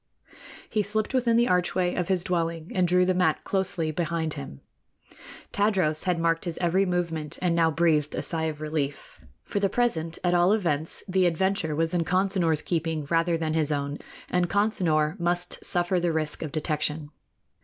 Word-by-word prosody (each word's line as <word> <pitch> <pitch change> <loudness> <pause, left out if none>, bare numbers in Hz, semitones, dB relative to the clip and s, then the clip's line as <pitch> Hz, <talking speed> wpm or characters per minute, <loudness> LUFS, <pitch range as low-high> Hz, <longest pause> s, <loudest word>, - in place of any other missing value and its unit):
He 215 - 0
slipped 210 +4 -2
within 240 -3 +2
the 240 +1 +3
archway 180 0 +1
of 180 -2 -2
his 185 -3 +1
dwelling 165 -2 -2
and 185 -1 +2
drew 180 +1 +3
the 185 - +2
mat 180 -4 +1
closely 180 -5 -1
behind 160 -1 -2
him. 140 - -8 0.9
Tadros 190 -7 +1
had 180 -2 +1
marked 165 +1 0
his 170 -2 -2
every 185 +3 +1
movement, 170 -4 -2
and 180 -2 +1
now 165 -1 +3
breathed 155 -2 +1
a - - -3
sigh 160 -1 -1
of 155 -1 -4
relief. 150 -2 -4 0.2
For 205 - -2
the 200 -1 +1
present, 170 -9 -1
at 175 -1 +2
all 175 +3 +4
events, 165 -7 0
the 185 -1 +2
adventure 175 -2 0
was 165 +2 0
in 175 -1 +1
Consinor's 180 -2 +1
keeping 160 -3 -2
rather 165 0 +2
than 160 -1 -2
his 155 -2 +1
own, 140 0 -2 0.3
and 180 -1 0
Consinor 180 -6 +1
must 175 +1 -1
suffer 175 +1 +2
the 175 -1 0
risk 155 -2 -1
of 155 - -4
detection. 150 -1 -2
170 Hz, 175 wpm, -26 LUFS, 155-185 Hz, 0.9 s, all